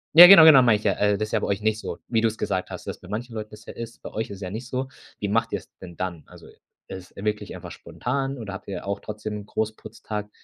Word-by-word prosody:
Ja, 175 Hz, +2 st, +13 dB
genau, 175 Hz, -4 st, +10 dB
genau, 145 Hz, -5 st, +9 dB
meine 115 Hz, -4 st, +4 dB
ich 105 Hz, -, -13 dB
ja, 100 Hz, -, +3 dB, 0.2 s
das -, -, -9 dB
ist -, -, -12 dB
ja 110 Hz, -, +3 dB
bei -, -, -3 dB
euch 100 Hz, +1 st, -1 dB
nicht 110 Hz, 0 st, 0 dB
so, -, -, -6 dB
wie 115 Hz, -2 st, +1 dB
du's 110 Hz, -1 st, 0 dB
gesagt 95 Hz, -2 st, -2 dB
hast, -, -, -8 dB
dass -, -, -5 dB
bei 90 Hz, -, -14 dB
manchen 115 Hz, +2 st, -5 dB
Leuten 105 Hz, 0 st, -5 dB
das 105 Hz, +1 st, -13 dB
ja -, -, -9 dB
ist. 115 Hz, 0 st, -8 dB
Bei -, -, -8 dB
euch 110 Hz, 0 st, -3 dB
ist 100 Hz, 0 st, -9 dB
ja 90 Hz, -, -4 dB
nicht 115 Hz, +5 st, -6 dB
so. 130 Hz, 0 st, -3 dB, 0.3 s
Wie 100 Hz, -, -2 dB
macht 115 Hz, +2 st, 0 dB
ihr's 100 Hz, -, -5 dB
denn 85 Hz, -3 st, -11 dB
dann? 90 Hz, -4 st, -4 dB
Also, -, -, -15 dB, 0.4 s
es 95 Hz, -1 st, -9 dB
wirklich 105 Hz, +1 st, -3 dB
einfach -, -, -9 dB
spontan 135 Hz, +2 st, -4 dB
oder 105 Hz, -4 st, -7 dB
habt 95 Hz, -, -9 dB
ihr 95 Hz, -, -5 dB
auch 100 Hz, 0 st, -2 dB
trotzdem 105 Hz, -1 st, -6 dB
Großputztag? 105 Hz, -1 st, -5 dB
105 Hz, 265 wpm, -24 LUFS, 100-115 Hz, 0.4 s, Ja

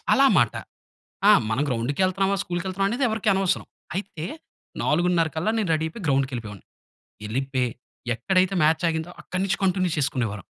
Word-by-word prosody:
అలా 275 Hz, -, +6 dB
మాట. -, -, +3 dB, 0.8 s
ఆ! -, -, +10 dB, 0.2 s
"మనం 115 Hz, +6 st, +1 dB
గ్రౌండ్‌కెళ్తన్నామా, 185 Hz, +11 st, +1 dB
స్కూల్‌కెళ్తన్నామా?" 185 Hz, +2 st, -1 dB
అనేది 245 Hz, +6 st, -1 dB
ఎవరికీ 220 Hz, 0 st, 0 dB
అనవసరం. 190 Hz, -1 st, 0 dB, 0.3 s
అయితే 180 Hz, -5 st, -4 dB, 0.6 s
4:30 170 Hz, +1 st, +2 dB
కల్లా 175 Hz, +7 st, 0 dB
నేను 205 Hz, -5 st, -1 dB
రెడీ 160 Hz, 0 st, 0 dB
అయిపోయి 190 Hz, +6 st, -9 dB
గ్రౌండ్‌కెళ్ళిపోయావాడిని. 125 Hz, -7 st, -1 dB, 0.6 s
వెళ్లిపోయి 130 Hz, +2 st, -1 dB, 0.5 s
ఎక్కడైతే 185 Hz, -, +1 dB
మ్యాచ్ 160 Hz, +3 st, +3 dB
ఆగిందో, 160 Hz, +1 st, -3 dB
అక్కడి 185 Hz, -, -3 dB
నుంచి 195 Hz, -, -1 dB
కంటిన్యూ 185 Hz, -1 st, +2 dB
చేసుకునేవారం. 120 Hz, -8 st, -1 dB
170 Hz, 135 wpm, -24 LUFS, 135-190 Hz, 0.8 s, ఆ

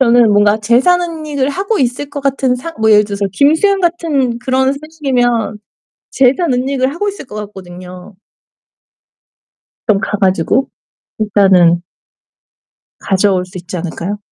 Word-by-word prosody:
저는 240 Hz, -3 st, +4 dB
뭔가 205 Hz, +1 st, +3 dB
재산 245 Hz, +12 st, +3 dB
은닉을 310 Hz, -5 st, -3 dB
하고 395 Hz, +8 st, -2 dB
있을 260 Hz, +3 st, -1 dB
것 285 Hz, -, -5 dB
같은 270 Hz, -2 st, 0 dB
상 330 Hz, +7 st, -7 dB
뭐 220 Hz, 0 st, +3 dB
예를 210 Hz, 0 st, +6 dB
들어서 200 Hz, -1 st, -3 dB
김수현 320 Hz, -, +2 dB
같은 310 Hz, -9 st, 0 dB
그런 260 Hz, +2 st, 0 dB
소식이면 265 Hz, -8 st, -1 dB, 0.5 s
재산 270 Hz, +3 st, +2 dB
은닉을 260 Hz, +1 st, -1 dB
하고 410 Hz, +5 st, -2 dB
있을 395 Hz, -, -9 dB
것 230 Hz, -, -11 dB
같거든요. 185 Hz, -2 st, -10 dB, 1.7 s
좀 210 Hz, -3 st, +3 dB
가 210 Hz, -, -2 dB
가지고 190 Hz, +7 st, +1 dB, 0.5 s
일단은 190 Hz, -5 st, +3 dB, 1.2 s
가져올 190 Hz, -1 st, +1 dB
수 185 Hz, +1 st, -10 dB
있지 180 Hz, +1 st, -7 dB
않을까요? 175 Hz, +4 st, -5 dB
245 Hz, 275 characters per minute, -14 LUFS, 200-280 Hz, 1.7 s, 예를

